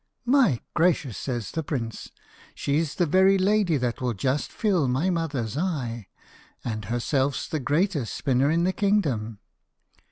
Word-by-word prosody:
"My 245 - +4
gracious," 155 - +1
says 120 -5 -4
the 160 - -2
prince, 120 -8 -4 0.5
"she's 150 +1 -1
the 175 - +2
very 190 +4 +4
lady 195 -4 +2
that 125 -2 -2
will 125 -3 -1
just 130 +8 -1
fill 185 - +1
my 140 +9 +1
mother's 145 - -2
eye, 130 - -2 0.6
and 110 -3 -3
herself's 130 +5 -1
the 155 - -2
greatest 145 - 0
spinner 135 +1 +1
in 165 +2 +2
the 185 +1 +1
kingdom. 145 - 0
145 Hz, 140 wpm, -25 LUFS, 125-180 Hz, 0.6 s, My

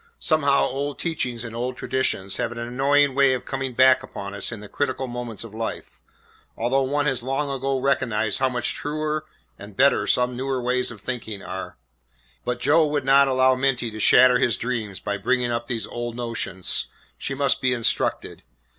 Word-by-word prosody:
Somehow 145 -3 +2
old 140 +2 -2
teachings 125 -8 -2
and 115 -1 -7
old 125 +2 -3
traditions 115 -7 -1
have - - -2
an 120 - -8
annoying 135 +4 +2
way 135 -1 +4
of 125 - -7
coming 135 -2 -4
back 130 +1 +6
upon 100 0 -7
us 100 +2 -3
in 115 - -6
the 105 - -10
critical 130 +2 -2
moments 120 -3 -6
of 115 -2 -11
life, 110 0 -6 0.6
although 125 +4 +1
one 145 +2 0
has 135 -4 0
long 135 +3 -2
ago 135 0 -1
recognised 115 -6 +1
how 130 0 +2
much 125 -1 -1
truer 155 +1 -3 0.3
and 100 0 -11
better 140 +1 +4
some 125 0 +2
newer 130 +1 -2
ways 125 +1 0
of 110 -4 -10
thinking 110 -4 -5
are. 95 +1 -7 0.7
But 125 0 -2
Joe 155 +4 +4
would 145 -2 -1
not 135 +1 +6
allow 130 0 +4
Minty 130 -3 0
to 110 - -8
shatter 125 +3 +6
his 115 -6 +2
dreams 115 -5 -3
by 100 0 -3
bringing 125 0 +1
up 120 0 -3
these 115 -4 -2
old 120 +1 -5
notions. 115 -6 -1 0.3
She 140 - -4
must 140 0 +1
be 130 - +2
instructed. 120 -2 0
125 Hz, 185 wpm, -23 LUFS, 115-135 Hz, 0.7 s, back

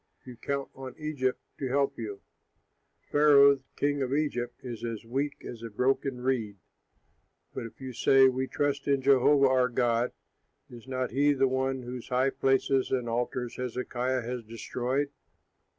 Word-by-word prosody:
You 125 -1 -9
count 140 +3 -3
on 130 -1 -9
Egypt 145 -5 -1 0.2
to 135 - -2
help 140 0 0
you. 105 -3 -6 0.9
Pharaoh, 140 -2 +6 0.2
king 145 0 0
of 130 +1 0
Egypt, 145 -5 -1
is 120 -3 -6
as 115 -2 -4
weak 140 +5 -3
as 115 -2 -8
a 115 - -6
broken 125 +3 0
reed. 120 -6 -1 1.0
But 115 - -5
if 110 - -17
you 130 -1 -7
say, 135 +3 +5
'We 130 0 0
trust 145 0 -1
in 140 -2 +2
Jehovah 135 +1 +5
our 130 -1 +3
God,' 120 0 +1 0.6
is 120 +1 -12
not 130 -1 -2
he 145 +4 +3
the 135 -1 +2
one 130 0 -1
whose 125 0 -7
high 130 +1 +2
places 135 0 +1
and 125 -2 -1
altars 120 +1 -2
Hezekiah 125 0 -2
has 120 0 -4
destroyed? 125 +5 -2
130 Hz, 155 wpm, -29 LUFS, 120-135 Hz, 1.0 s, Pharaoh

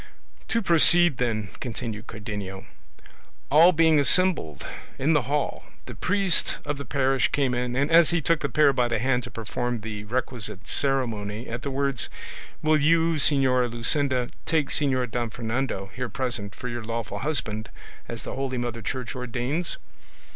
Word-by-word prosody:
"To 230 -1 0
proceed, 175 -3 +6
then," 110 -6 -1
continued 115 -3 -6
Cardenio: 105 -3 -6 0.9
"all 165 +5 +7
being 160 -2 +4
assembled 150 - +2 0.3
in 145 +5 +2
the 150 - +1
hall, 145 0 -1 0.2
the - - -8
priest 190 -2 +1
of 145 -1 -3
the 140 - -6
parish 135 -2 +1
came 135 -3 0
in 125 0 -2
and 140 +4 0
as 165 -1 +6
he 170 - +1
took 165 +1 +1
the - - -2
pair 150 -2 +4
by 125 -2 +1
the 120 -1 0
hand 125 +2 +1
to - - -8
perform 120 +1 -3
the 105 -1 -6
requisite 120 -1 -3
ceremony, 115 -5 -1
at 120 +1 -5
the 140 - -3
words, 140 -1 0 0.5
'Will 155 -1 +3
you, 165 +2 +3
Señora 130 -4 +3
Luscinda, 125 +2 +1 0.2
take 155 -4 +1
Señor 130 -5 +1
Don 120 0 -2
Fernando, 115 -4 -3
here 125 -1 -4
present, 115 -4 -3
for 125 - -6
your 120 -1 -5
lawful 115 0 -4
husband, 110 -8 -2 0.4
as - - -7
the - - -6
holy 130 -1 -3
Mother 120 -1 -3
Church 125 +2 -4
ordains? 125 +7 -3
130 Hz, 160 wpm, -25 LUFS, 115-145 Hz, 0.9 s, all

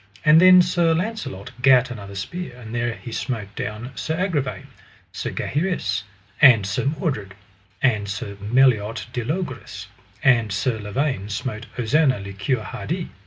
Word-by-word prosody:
And 155 +2 +7
then 185 0 +8
Sir 175 -2 +2
Launcelot 180 - -4
gat 130 -1 +5
another 100 -4 -8
spear, 130 - -5
and 115 -2 -10
there 120 0 -1
he 105 +3 -9
smote 110 -4 -4
down 110 +5 -5
Sir 160 +4 -3
Agravaine, 155 -9 -1 0.5
Sir - - -4
Gaheris, 145 - -1 0.4
and 120 -8 +7
Sir 100 +6 -2
Mordred, 135 - -2 0.5
and 105 -6 +2
Sir 100 0 -5
Meliot 115 -1 +2
de 120 - -2
Logris; 170 +9 -5 0.3
and 120 -5 +4
Sir 110 +4 -1
Lavaine 105 0 -2
smote 110 +2 -4
Ozanna 130 +1 +2
le 100 0 -7
Cure 110 +4 -1
Hardy. 160 - -4
120 Hz, 145 wpm, -22 LUFS, 105-150 Hz, 0.5 s, then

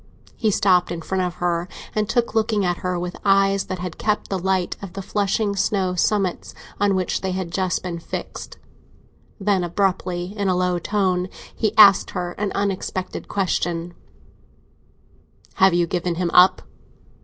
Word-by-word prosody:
He 220 - +1
stopped 185 -3 +3
in 165 -1 -5
front 190 +2 -1
of 180 -1 -2
her 175 0 -1 0.3
and 215 -1 -1
stood 240 -1 0
looking 215 -3 +1
at 175 -1 0
her, 180 -1 -2
with 175 0 -4
eyes 195 0 +3
that 185 - -4
had 180 -1 -6
kept 210 -1 -1
the 190 - 0
light 190 0 0
of 195 -3 -8
the 195 - -5
flushing 200 +1 0
snow 190 -2 0
summits 190 0 0 0.2
on 200 -1 +2
which 185 -1 -1
they 190 -1 -2
had 185 -2 -4
just 185 0 -1
been 175 -2 -4
fixed. - - -7 0.8
Then, 195 -2 +1
abruptly, 180 0 -1
in 200 -2 -1
a 185 - +2
low 180 -1 +1
tone, 185 -1 0 0.3
he 215 -3 -1
asked 200 -3 +7
her 175 -1 -3
an 210 -1 -1
unexpected 190 -2 -3
question: 175 -3 -1 1.7
"Have 190 -2 +6
you 175 0 +3
given 175 0 -2
him 175 0 -1
up?" 185 +1 +6
185 Hz, 165 wpm, -22 LUFS, 180-200 Hz, 1.7 s, asked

